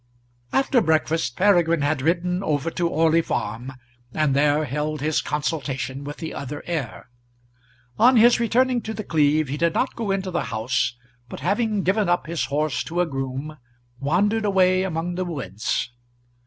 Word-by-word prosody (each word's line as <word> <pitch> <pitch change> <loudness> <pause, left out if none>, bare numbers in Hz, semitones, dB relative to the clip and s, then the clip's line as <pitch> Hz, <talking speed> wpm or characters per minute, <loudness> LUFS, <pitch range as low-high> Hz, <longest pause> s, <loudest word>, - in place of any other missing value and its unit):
After 270 -2 +3
breakfast 160 - 0
Peregrine 175 -5 +3
had 145 -1 0
ridden 175 +4 0
over 155 -2 -1
to 170 0 -1
Orley 165 +1 +3
Farm, 120 -2 -4 0.4
and 150 -3 +2
there 145 +2 +3
held 150 +3 -3
his 155 +2 0
consultation 145 -3 -3
with 145 +1 -7
the 160 -2 -6
other 140 +1 -6
heir. 150 -9 -5 0.9
On 245 +2 +6
his 240 +2 +6
returning 245 +1 +2
to 220 0 -5
The 215 - -4
Cleeve, 155 -3 +2
he 140 +3 -3
did 170 0 +1
not 260 - 0
go 225 -3 -3
into 195 -1 -1
the 175 -4 -1
house, 120 +2 -1 0.3
but - - -8
having 205 - 0
given 195 +1 +1
up 175 0 +1
his 155 -4 -2
horse 145 +1 -1
to 170 +2 -3
a - - +2
groom, 135 +1 -5 0.4
wandered 200 +10 +1
away 185 -2 +3
among 175 -1 -2
the 185 +1 -2
woods. 125 - -3
160 Hz, 165 wpm, -23 LUFS, 145-185 Hz, 0.9 s, On